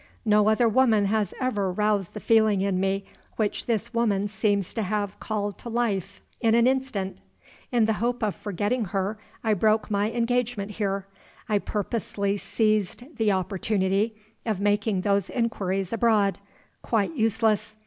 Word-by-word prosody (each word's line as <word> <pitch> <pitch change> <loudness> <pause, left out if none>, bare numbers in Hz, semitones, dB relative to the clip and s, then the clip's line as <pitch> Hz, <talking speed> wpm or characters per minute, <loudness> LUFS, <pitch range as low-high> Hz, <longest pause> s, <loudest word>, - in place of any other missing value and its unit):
No 210 0 +4
other 225 +2 +3
woman 225 -3 +4
has 210 -1 +1
ever 210 -8 0
roused 210 -1 0
the - - -4
feeling 220 -3 +3
in 195 -2 0
me 195 +1 0 0.3
which 215 -2 -1
this 230 0 -1
woman 210 -4 +1
seems 205 -2 0
to 225 - -2
have 205 0 -2
called 205 -2 -3
to 235 - -7
life 200 -5 -2 0.2
in 225 -1 +3
an 235 0 +5
instant. 255 - -1 0.5
In 235 -3 +3
the 220 - +2
hope 240 0 0
of 210 -3 +1
forgetting 210 +4 -1
her 195 +3 -2 0.2
I 220 -2 +3
broke 215 +2 +2
my 205 +1 +1
engagement 235 -3 -1
here; 195 -2 -2 0.4
I 210 -2 +2
purposely 200 -1 -2
seized 215 - -1
the 220 -2 +2
opportunity 195 +2 0 0.3
of 215 -5 -1
making 205 -1 +1
those 200 -1 +1
inquiries 195 -5 -1
abroad. 215 -4 +2 0.4
Quite 225 +7 0
useless. 220 -2 +1
210 Hz, 150 wpm, -26 LUFS, 200-225 Hz, 0.5 s, an